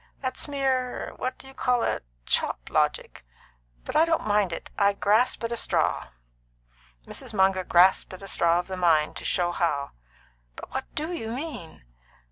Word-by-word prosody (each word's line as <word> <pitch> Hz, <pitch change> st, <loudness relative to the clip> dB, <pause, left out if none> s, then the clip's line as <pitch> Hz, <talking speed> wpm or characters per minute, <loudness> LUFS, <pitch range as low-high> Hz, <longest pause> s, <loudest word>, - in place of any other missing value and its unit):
That's 260 Hz, +1 st, -2 dB
mere 265 Hz, -3 st, -1 dB
what 255 Hz, -, -3 dB
do 265 Hz, -, -12 dB
you 270 Hz, -, -11 dB
call 250 Hz, -2 st, +1 dB
it? -, -, -1 dB, 0.2 s
chop -, -, 0 dB
logic. -, -, 0 dB, 0.6 s
But -, -, -6 dB
I 315 Hz, -, +6 dB
don't 330 Hz, -1 st, +1 dB
mind 205 Hz, -3 st, +2 dB
it. 165 Hz, -, -6 dB
I 200 Hz, -1 st, +3 dB
grasp 215 Hz, +5 st, +2 dB
at 230 Hz, -, -2 dB
a -, -, 0 dB
straw." -, -, 0 dB, 1.0 s
Mrs. 220 Hz, -, -5 dB
Munger 190 Hz, -1 st, +3 dB
grasped 180 Hz, +2 st, +4 dB
at 185 Hz, -, -13 dB
a -, -, -7 dB
straw 170 Hz, -2 st, +3 dB
of 175 Hz, -, -1 dB
the 190 Hz, -1 st, -6 dB
mind, 160 Hz, -4 st, +3 dB
to -, -, -6 dB
show 175 Hz, -1 st, +1 dB
how. 150 Hz, -5 st, -1 dB, 0.6 s
"But -, -, -10 dB
what 265 Hz, 0 st, -2 dB
do 310 Hz, +3 st, -3 dB
you 225 Hz, -10 st, -4 dB
mean?" 250 Hz, -, -6 dB
205 Hz, 175 wpm, -26 LUFS, 175-260 Hz, 1.0 s, I